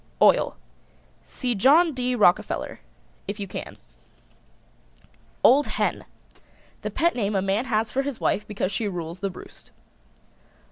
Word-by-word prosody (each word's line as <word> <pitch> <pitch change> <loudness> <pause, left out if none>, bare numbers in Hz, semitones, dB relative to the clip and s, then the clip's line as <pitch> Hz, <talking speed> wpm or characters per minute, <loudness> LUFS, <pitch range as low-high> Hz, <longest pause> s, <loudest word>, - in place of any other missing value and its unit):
OIL. - - +4 0.7
See 250 -2 -3
John 295 - +4
D. 250 -1 -1
Rockerfeller 205 -5 +1 0.5
if 200 +2 -5
you 200 - -4
can. - - -7 1.7
OLD 285 +3 +6
HEN. - - -1 0.8
The - - -3
pet 340 +1 +1
name 210 -3 -1
a 190 - +2
man 195 +5 0
has 220 -3 0
for 270 - 0
his 275 -3 -4
wife 210 +1 0
because 200 -2 -2
she 210 +2 -1
rules 170 -2 -5
the 195 - -2
roost. 180 - -13
215 Hz, 135 wpm, -24 LUFS, 195-260 Hz, 1.7 s, OLD